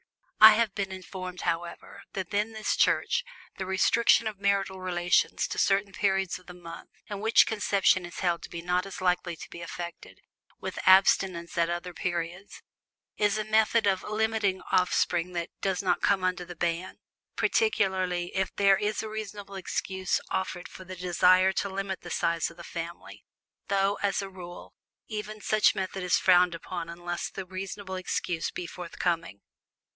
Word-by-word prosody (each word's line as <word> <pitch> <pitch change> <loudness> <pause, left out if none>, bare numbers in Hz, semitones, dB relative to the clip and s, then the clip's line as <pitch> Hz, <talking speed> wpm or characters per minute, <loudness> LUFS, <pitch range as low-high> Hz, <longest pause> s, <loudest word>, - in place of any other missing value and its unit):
I 220 0 +12
have 220 -2 +1
been 195 -1 -3
informed, 185 -1 -7
however, 170 0 -4
that 190 0 -5
in 210 +2 0
this 215 0 -1
Church - - +2 0.4
the 190 - -2
restriction 225 +5 +4
of 215 -3 -4
marital 195 -2 0
relations 175 -1 +1
to - - -4
certain 195 0 +2
periods 195 -2 0
of 185 - -23
the 180 - -10
month 170 -1 -10 0.2
in 205 -2 -5
which 220 +2 +5
conception 200 -4 +2
is 175 - -8
held 175 -2 +1
to - - -9
be 170 -1 -7
not 180 +2 0
so 185 - -6
likely 180 -1 +1
to - - -10
be 170 - -8
effected, 170 0 -8 0.4
with - - -5
abstinence 185 -2 +4
at 170 0 +2
other 175 +1 -4
periods, 175 +2 -4 0.5
is 210 0 +2
a 215 - -1
method 220 +1 +3
of 190 -2 +2
limiting 215 -3 0
offspring 180 -1 +2
that 170 -1 -3
does 190 -1 -1
not 185 - +1
come 195 -2 +2
under 185 -1 0
the 175 - -9
ban, 170 +2 -2 0.4
particularly 185 - +1
if 190 -1 +1
there 195 -1 +5
be 210 - 0
a 220 - -3
reasonable 210 -2 -7
excuse 190 0 -2
offered 190 -1 -2
for 185 - -11
the 185 0 -8
desire 180 +1 +4
to 200 - -1
limit 195 0 -4
the 175 - -9
size 170 0 0
of 170 - -16
the 170 - -9
family; 170 0 -7 0.4
though, 200 0 +1
as 200 -1 0
a 195 - -6
rule, 175 -2 -10 0.3
even 215 0 -5
such 215 0 +3
method 190 0 -3
is 180 -1 +2
frowned 180 -2 +4
upon 170 0 -6
unless 175 +1 -4
the 195 - -7
reasonable 190 +1 -6
excuse 180 -2 -2
be 180 - -6
forthcoming. 165 - -3
185 Hz, 170 wpm, -28 LUFS, 175-200 Hz, 0.5 s, I